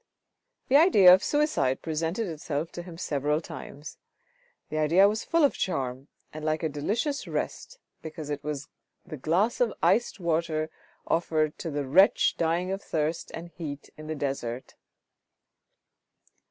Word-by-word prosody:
The 275 - +6
idea 205 - +8
of 185 - +4
suicide 295 - +1
presented 165 +7 -1
itself 155 -1 -4
to 175 - -6
him 175 -1 -10
several 150 -2 0
times; 150 -2 -9 0.7
the 155 - -2
idea 170 +6 +5
was 215 +2 -1
full 335 -1 +2
of 285 - +4
charm, 130 -5 -3 0.3
and 155 0 -7
like 155 +1 -1
a 160 - +1
delicious 215 - -2
rest; - - -4 0.2
because 155 -1 -7
it 145 0 -4
was 145 -1 -4 0.4
the 170 - -7
glass 175 - +1
of 235 -3 +3
iced 240 -2 +2
water 160 -2 -1 0.3
offered 155 -2 0
to 165 - -4
the 145 -2 -2
wretch 185 +10 +4
dying 170 +3 0
of 195 +1 -3
thirst 160 -1 -2
and 170 +1 -8
heat 155 -4 -8
in 155 0 -10
the 155 - -3
desert. 135 -4 -4
160 Hz, 150 wpm, -27 LUFS, 150-185 Hz, 0.7 s, idea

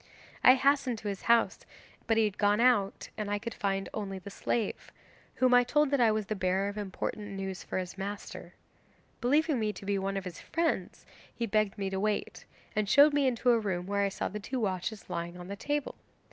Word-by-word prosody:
I 255 - +9
hastened 275 -2 +2
to 210 -1 -4
his 195 -1 -5
house, 235 0 +3 0.5
but 225 - +2
he 225 - +5
had 210 -2 -2
gone 205 0 +3
out, 235 -5 +2
and 210 -1 -2
I 205 - 0
could 230 +3 -5
only 195 0 -2
find 185 - -12
the 200 - -8
slave, 220 +1 -2 0.4
whom 255 -1 +3
I 245 0 +7
told 295 +3 +2
that 280 -3 +2
I 225 -2 +5
was 215 -1 -1
the 215 - -3
bearer 190 +1 0
of 205 - -7
important 205 +1 -4
news 195 -1 -4
for - - -4
his 185 +1 -5
master. 200 +1 -6 0.7
Believing 290 +2 +2
me 215 -1 0
to 200 - -10
be 200 0 0
one 195 +1 -2
of 195 - -4
his 180 -2 -7
friends, 330 -1 -2 0.3
he 235 - -3
begged 215 -2 +1
me 195 -1 -2
to 190 - -2
wait, 210 +1 -2 0.3
and 210 -2 0
showed 285 +5 +7
me 285 -2 +3
into 245 0 +2
a 235 - +4
room 185 -5 -2
where 200 +1 0
I 200 - +2
saw 195 - -3
the 210 - -5
two 260 +5 -4
watches 195 0 -3
lying 170 +1 -4
on 180 +1 -9
the 200 - -4
table. 290 +6 -2
210 Hz, 220 wpm, -30 LUFS, 195-245 Hz, 0.7 s, I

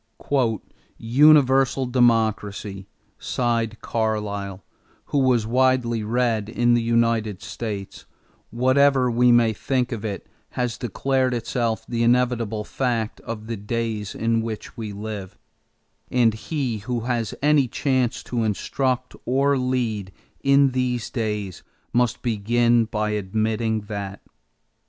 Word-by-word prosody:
"Universal 135 +1 +4
democracy," 110 -5 +1 0.3
sighed 115 -2 -1
Carlyle, 100 -3 -2 0.5
who 145 - +3
was 125 -4 +3
widely 125 -1 +2
read 115 -1 0
in 120 +1 +2
the 120 - +3
United 115 -3 +1
States, 105 -4 -6 0.4
"whatever 130 +1 +3
we 120 +1 +4
may 120 -2 +4
think 125 +3 -1
of 115 -3 -4
it 100 -3 -4 0.3
has 125 -2 -1
declared 130 +3 0
itself 115 -1 -2
the 115 0 -2
inevitable 120 -3 +1
fact 115 -1 -2
of 110 -1 -7
the 115 +1 -4
days 110 0 -3
in 115 0 +1
which 110 0 -6
we 110 -4 -5
live; 100 -2 -7 0.7
and 120 -3 +3
he 120 0 -3
who 120 +3 -3
has 120 -2 -2
any 145 -3 +4
chance 130 -1 0
to 120 -2 -2
instruct 125 +4 -1
or 140 +3 +2
lead 120 -7 -1 0.3
in 140 0 +5
these 125 -2 -1
days 105 -6 -3 0.3
must 120 0 +1
begin 120 +1 +2
by 105 -1 -2
admitting 110 +2 -1
that 100 -1 -6
115 Hz, 120 wpm, -23 LUFS, 110-125 Hz, 0.7 s, in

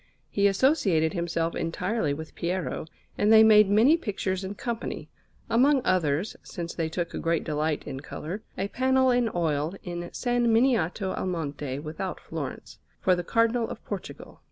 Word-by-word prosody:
He 200 0 +3
associated 195 - +2
himself 170 -2 -1
entirely 180 0 -1
with 160 +2 -6
Piero, 175 -2 -3 0.3
and 210 +1 +4
they 220 0 +9
made 210 -2 +7
many 230 +11 +5
pictures 195 - -3
in 190 +2 -5
company; 235 +2 -4 0.4
among 265 +3 +3
others, 170 0 +1
since 170 -3 -6
they 165 -2 -2
took 170 +1 -2
great 165 -1 0
delight 155 0 -1
in 135 - -5
colour, 165 +7 -6 0.2
a 195 - -1
panel 260 +1 +3
in 245 -2 +2
oil 160 0 0
in 175 -1 -5
S. 175 +8 -8
Miniato 230 -6 +2
al - - -3
Monte 145 -6 -3
without 160 +5 -5
Florence, 150 -5 -7 0.2
for 185 - +3
the 175 - -3
Cardinal 230 +4 +1
of - - -8
Portugal. - - -7
185 Hz, 155 wpm, -27 LUFS, 160-225 Hz, 0.4 s, they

